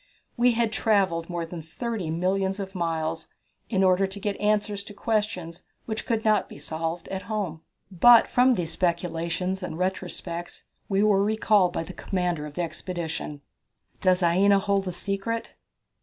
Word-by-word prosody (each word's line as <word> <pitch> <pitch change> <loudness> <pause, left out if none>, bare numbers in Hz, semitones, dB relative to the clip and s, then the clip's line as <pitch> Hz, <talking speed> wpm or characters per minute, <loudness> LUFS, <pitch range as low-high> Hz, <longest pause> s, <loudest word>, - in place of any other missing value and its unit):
We 245 0 +4
had 230 -1 0
travelled 190 -8 +1
more 170 -1 -2
than 165 0 -7
thirty 200 +2 -4
millions 190 +4 0
of 195 -1 -5
miles 165 -3 -2 0.4
in 195 -4 +2
order 190 +1 +4
to 195 +1 -7
get 205 0 -2
answers 210 -1 +1
to 205 - -11
questions 205 -7 -2 0.2
which 220 -1 -4
could 225 -1 0
not 215 -1 +3
be - - -10
solved 165 +3 -4
at 190 0 -3
home. 190 -7 -2 0.3
But 230 +6 +7
from 250 0 +4
these 170 -4 -2
speculations 175 +1 -1
and 170 -3 -5
retrospects 180 -2 -4 0.3
we 195 0 +2
were 200 -2 +4
recalled 210 -3 +3
by - - -2
the 185 - -9
commander 175 -6 -2
of 145 - -12
the 175 - -1
expedition. 165 -4 -5 0.6
Does 185 -1 +3
Aina 195 +4 +5
Hold 195 0 +1
the 180 - -2
Secret? 195 +5 -3
190 Hz, 160 wpm, -26 LUFS, 170-210 Hz, 0.6 s, But